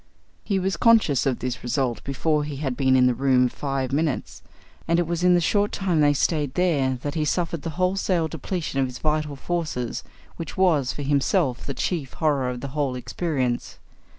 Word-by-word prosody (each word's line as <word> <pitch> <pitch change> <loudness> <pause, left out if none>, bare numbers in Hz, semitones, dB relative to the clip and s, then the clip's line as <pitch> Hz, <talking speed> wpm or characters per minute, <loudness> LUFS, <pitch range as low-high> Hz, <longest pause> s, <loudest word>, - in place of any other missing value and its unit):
He 200 - 0
was 190 +1 -1
conscious 220 - +4
of 130 -3 +1
this 125 -2 -4
result 125 -1 -1
before 150 +2 0
he 145 -1 -5
had 135 -2 -3
been 130 -1 +3
in 130 -1 +5
the 125 - +4
room 130 0 +3
five 135 0 -3
minutes, 155 0 -1 0.5
and 170 0 +3
it 175 - +2
was 170 +1 -2
in 180 0 +6
the - - +4
short 205 +4 +1
time 180 -5 0
they 145 -1 +5
stayed 145 -1 0
there 140 -8 +1
that 145 - -2
he 155 - 0
suffered 170 0 -1
the 165 - -4
wholesale 185 -2 +1
depletion 160 -2 -3
of 135 - +2
his 125 0 -8
vital 150 -1 -1
forces, 150 -6 -3 0.3
which 165 - -7
was, 160 -9 +3
for 145 - -6
himself, 140 -1 +1
the 140 - -3
chief 155 -8 -2
horror 140 -5 +1
of 125 -1 -5
the 140 - -5
whole 140 -2 -1
experience. 125 0 -2
145 Hz, 195 wpm, -24 LUFS, 130-170 Hz, 0.5 s, in